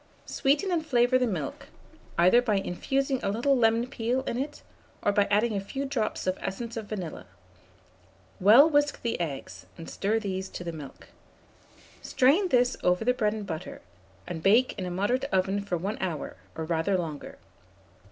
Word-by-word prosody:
Sweeten 290 Hz, +8 st, +1 dB
and 335 Hz, -3 st, +1 dB
flavour 250 Hz, -3 st, +3 dB
the 250 Hz, -, +1 dB
milk, 165 Hz, -, -4 dB, 0.5 s
either 185 Hz, +8 st, +6 dB
by 225 Hz, -4 st, 0 dB
infusing 265 Hz, +8 st, -1 dB
a -, -, -1 dB
little 240 Hz, +7 st, +2 dB
lemon 230 Hz, -1 st, +3 dB
peel 250 Hz, 0 st, -1 dB
in 235 Hz, -, -3 dB
it, 285 Hz, +4 st, -4 dB, 0.4 s
or -, -, +3 dB
by 200 Hz, 0 st, +2 dB
adding 210 Hz, +2 st, +2 dB
a -, -, 0 dB
few 270 Hz, +8 st, -4 dB
drops 260 Hz, -6 st, -2 dB
of 185 Hz, 0 st, -1 dB
essence 230 Hz, +5 st, -5 dB
of 220 Hz, -2 st, -5 dB
vanilla; 185 Hz, -7 st, -6 dB, 1.1 s
well 225 Hz, +10 st, +8 dB
whisk 290 Hz, -2 st, +1 dB
the 235 Hz, -, -1 dB
eggs, 135 Hz, -, -6 dB
and 165 Hz, -, -9 dB
stir 210 Hz, +3 st, -1 dB
these 190 Hz, -3 st, -3 dB
to -, -, -7 dB
the 170 Hz, -, -4 dB
milk. 150 Hz, -4 st, -10 dB, 0.9 s
Strain 295 Hz, +10 st, +3 dB
this 250 Hz, -3 st, +3 dB
over 180 Hz, +4 st, +1 dB
the 250 Hz, -, +4 dB
bread 215 Hz, -5 st, 0 dB
and 215 Hz, -2 st, -5 dB
butter, 160 Hz, -4 st, -6 dB, 0.5 s
and 165 Hz, -2 st, -6 dB
bake 225 Hz, +8 st, +4 dB
in 185 Hz, -, -4 dB
a -, -, -3 dB
moderate 205 Hz, +9 st, 0 dB
oven 195 Hz, -5 st, 0 dB
for 195 Hz, -3 st, -2 dB
1 195 Hz, +6 st, -4 dB
hour, 170 Hz, -5 st, -3 dB, 0.2 s
or 160 Hz, -, -4 dB
rather 165 Hz, +4 st, 0 dB
longer. 160 Hz, -5 st, -6 dB
215 Hz, 175 wpm, -27 LUFS, 185-255 Hz, 1.1 s, well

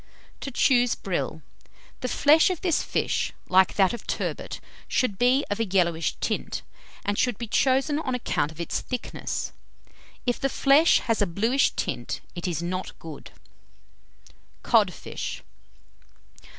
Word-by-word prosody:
TO -, -, -5 dB
CHOOSE 245 Hz, -1 st, +3 dB
BRILL. 165 Hz, -4 st, -3 dB, 0.6 s
The 255 Hz, -, -3 dB
flesh 305 Hz, +8 st, +5 dB
of 365 Hz, -3 st, -3 dB
this 345 Hz, -4 st, +2 dB
fish, -, -, -1 dB, 0.2 s
like 185 Hz, 0 st, +4 dB
that 190 Hz, 0 st, +4 dB
of 235 Hz, -, -8 dB
turbot, -, -, -3 dB, 0.3 s
should 210 Hz, -7 st, 0 dB
be 255 Hz, +3 st, +4 dB
of 205 Hz, -, -1 dB
a 225 Hz, -, +1 dB
yellowish 170 Hz, -4 st, +1 dB
tint, -, -, -3 dB, 0.4 s
and 205 Hz, 0 st, 0 dB
should 245 Hz, -3 st, +1 dB
be 235 Hz, -, -4 dB
chosen 270 Hz, +6 st, +2 dB
on 260 Hz, -5 st, -2 dB
account 160 Hz, -10 st, -1 dB
of 160 Hz, -, -14 dB
its 170 Hz, -, -2 dB
thickness. 250 Hz, -2 st, -4 dB, 0.7 s
If 245 Hz, -1 st, 0 dB
the 275 Hz, -, 0 dB
flesh 280 Hz, +5 st, +5 dB
has 225 Hz, -2 st, 0 dB
a 205 Hz, -, +3 dB
bluish 225 Hz, +10 st, +2 dB
tint, -, -, -3 dB
it 175 Hz, 0 st, -4 dB
is 170 Hz, -1 st, -2 dB
not 185 Hz, +2 st, -4 dB
good. 160 Hz, -3 st, -10 dB, 1.3 s
CODFISH. -, -, 0 dB
230 Hz, 140 wpm, -26 LUFS, 185-265 Hz, 1.3 s, flesh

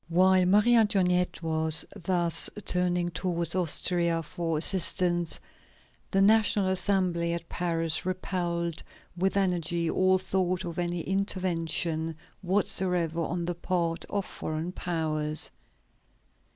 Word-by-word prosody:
While 185 Hz, +1 st, +4 dB
Marie 210 Hz, +5 st, +4 dB
Antoinette 180 Hz, -6 st, +2 dB
was 160 Hz, -1 st, +1 dB
thus 175 Hz, -3 st, +2 dB, 0.2 s
turning 180 Hz, -1 st, 0 dB
towards 170 Hz, 0 st, -1 dB
Austria 170 Hz, -1 st, +2 dB
for 165 Hz, -1 st, -3 dB
assistance, 175 Hz, 0 st, +3 dB, 0.7 s
the 195 Hz, 0 st, +2 dB
National 210 Hz, -2 st, +3 dB
Assembly 180 Hz, -3 st, 0 dB
at 170 Hz, -1 st, -6 dB
Paris 165 Hz, -2 st, -1 dB
repelled 175 Hz, -2 st, -3 dB, 0.3 s
with 190 Hz, +3 st, 0 dB
energy 175 Hz, -3 st, 0 dB
all 185 Hz, 0 st, +3 dB
thought 185 Hz, -1 st, -2 dB
of 170 Hz, 0 st, -5 dB
any 175 Hz, 0 st, -2 dB
intervention 165 Hz, -4 st, -1 dB, 0.3 s
whatsoever 180 Hz, -3 st, 0 dB
on 170 Hz, +1 st, -3 dB
the 175 Hz, -, -2 dB
part 170 Hz, -1 st, -2 dB
of 200 Hz, -2 st, -3 dB
foreign 155 Hz, +3 st, -5 dB
powers. 155 Hz, -4 st, -1 dB
175 Hz, 110 wpm, -27 LUFS, 170-185 Hz, 0.7 s, While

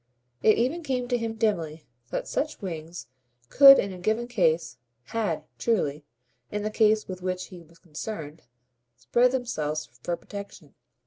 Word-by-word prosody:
It 215 Hz, -, +5 dB
even 260 Hz, +9 st, 0 dB
came 255 Hz, -5 st, -2 dB
to 245 Hz, -, +2 dB
him 225 Hz, -1 st, -3 dB
dimly 165 Hz, -9 st, -1 dB, 0.2 s
that -, -, -3 dB
such 305 Hz, +1 st, -2 dB
wings 170 Hz, -, -6 dB, 0.4 s
could 275 Hz, -1 st, +10 dB
in 195 Hz, -1 st, -1 dB
a 180 Hz, -, -9 dB
given 220 Hz, +6 st, 0 dB
case 170 Hz, -8 st, +1 dB, 0.3 s
HAD, 225 Hz, -, -2 dB, 0.2 s
truly, 155 Hz, -10 st, 0 dB, 0.5 s
in 210 Hz, 0 st, -2 dB
the 215 Hz, -, -2 dB
case 215 Hz, 0 st, +3 dB
with 185 Hz, -1 st, -7 dB
which 185 Hz, 0 st, -3 dB
he 180 Hz, -2 st, -11 dB
was 165 Hz, 0 st, -20 dB
concerned 160 Hz, -2 st, -7 dB, 0.6 s
spread 240 Hz, -, +3 dB
themselves 155 Hz, -, -2 dB, 0.2 s
for 175 Hz, +4 st, -2 dB
protection. 200 Hz, -6 st, -10 dB
200 Hz, 150 wpm, -26 LUFS, 165-230 Hz, 0.6 s, could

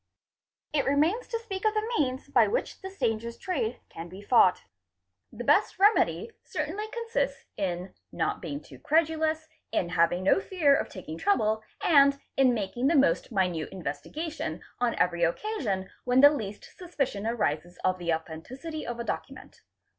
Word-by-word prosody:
It 285 Hz, -3 st, +2 dB
remains 310 Hz, -, +2 dB
to 460 Hz, -, -2 dB
speak 400 Hz, -4 st, -6 dB
of 435 Hz, 0 st, +2 dB
the 435 Hz, +2 st, -1 dB
means 260 Hz, -, 0 dB
by -, -, +4 dB
which -, -, -2 dB
this 385 Hz, +1 st, -8 dB
dangerous 230 Hz, +1 st, -1 dB
trade 265 Hz, -, -2 dB
can 165 Hz, +1 st, -8 dB
_ -, -, -15 dB
be 185 Hz, +2 st, -10 dB
fought. 200 Hz, -5 st, +4 dB, 0.7 s
The 245 Hz, -, -7 dB
best 295 Hz, +10 st, +3 dB
remedy 415 Hz, +3 st, +3 dB
certainly 335 Hz, +8 st, -3 dB
consists 460 Hz, +1 st, -2 dB
in 180 Hz, -1 st, -3 dB, 0.2 s
not -, -, -1 dB
being 145 Hz, -4 st, -5 dB
too 130 Hz, -4 st, -14 dB
credulous, 315 Hz, -, +1 dB, 0.2 s
in 175 Hz, -, 0 dB
having 175 Hz, +1 st, +2 dB
no 195 Hz, -, +4 dB
fear 345 Hz, -8 st, +3 dB
of -, -, 0 dB
taking 165 Hz, -4 st, -8 dB
trouble, 220 Hz, -, +2 dB, 0.2 s
and 280 Hz, -3 st, +5 dB, 0.2 s
in 265 Hz, -2 st, +5 dB
making 230 Hz, +5 st, -1 dB
the 330 Hz, -, +3 dB
most 275 Hz, -2 st, +3 dB
minute 180 Hz, -6 st, 0 dB
investi 165 Hz, -7 st, -6 dB
gation 320 Hz, +1 st, -4 dB, 0.2 s
on 245 Hz, -1 st, +1 dB
every 175 Hz, -1 st, +1 dB
occasion 195 Hz, -, -1 dB, 0.2 s
when 250 Hz, +1 st, +4 dB
the 285 Hz, +1 st, +9 dB
least 210 Hz, -8 st, -6 dB
suspicion 275 Hz, -, -3 dB
arises 175 Hz, -6 st, -1 dB
of 185 Hz, 0 st, +1 dB
the 170 Hz, -1 st, -1 dB
authenticity 240 Hz, -, -5 dB
| -, -, -5 dB
ofadocument. 235 Hz, 0 st, -6 dB
255 Hz, 160 wpm, -28 LUFS, -, 0.7 s, the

